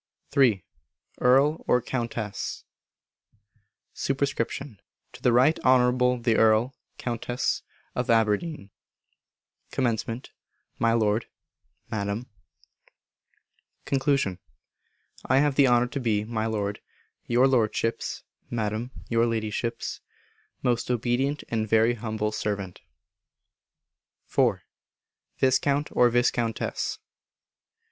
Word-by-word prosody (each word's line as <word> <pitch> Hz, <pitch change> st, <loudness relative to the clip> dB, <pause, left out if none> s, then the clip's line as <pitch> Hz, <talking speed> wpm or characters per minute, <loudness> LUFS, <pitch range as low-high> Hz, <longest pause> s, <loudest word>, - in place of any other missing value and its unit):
iii. 120 Hz, -, +4 dB, 0.5 s
Earl 135 Hz, +5 st, +4 dB
or 125 Hz, -, +4 dB
Countess. 115 Hz, -4 st, -4 dB, 1.3 s
Sup. 135 Hz, -, -2 dB
To 135 Hz, -4 st, -4 dB
the 125 Hz, -, +3 dB
Right 130 Hz, +7 st, +4 dB
Honourable 125 Hz, 0 st, +3 dB
the 115 Hz, -2 st, +1 dB
Earl 110 Hz, +4 st, +4 dB, 0.2 s
(Countess) 120 Hz, +1 st, -2 dB, 0.3 s
of 125 Hz, -, -2 dB
Aberdeen. 115 Hz, +1 st, +1 dB, 1.0 s
Comm. 120 Hz, -1 st, -1 dB, 0.5 s
My 115 Hz, 0 st, +3 dB
Lord 110 Hz, -1 st, +1 dB, 0.6 s
(Madam). 105 Hz, +2 st, -2 dB, 1.6 s
Con. 135 Hz, -8 st, +1 dB, 0.9 s
I 130 Hz, -, +4 dB
have 145 Hz, +1 st, +3 dB
the 135 Hz, 0 st, +5 dB
honour 120 Hz, -1 st, +4 dB
to 140 Hz, -, -3 dB
be, 110 Hz, -4 st, 0 dB
My 110 Hz, -1 st, -2 dB
Lord, 105 Hz, -2 st, -2 dB, 0.5 s
Your 125 Hz, +2 st, +4 dB
Lordship's 115 Hz, -2 st, 0 dB, 0.3 s
(Madam, 110 Hz, +1 st, -2 dB, 0.2 s
Your 115 Hz, 0 st, +2 dB
Ladyship's) 115 Hz, +1 st, -3 dB, 0.6 s
most 120 Hz, -1 st, 0 dB
obedient 125 Hz, +4 st, 0 dB
and 110 Hz, -2 st, -1 dB
very, 115 Hz, +2 st, +4 dB
humble 110 Hz, -2 st, -2 dB
servant. 100 Hz, -4 st, -4 dB, 1.5 s
iv. -, -, +2 dB, 0.8 s
_Viscount 140 Hz, +2 st, +1 dB
or 125 Hz, -, +6 dB
Viscountess. 120 Hz, -1 st, 0 dB
120 Hz, 90 wpm, -26 LUFS, 110-130 Hz, 1.6 s, or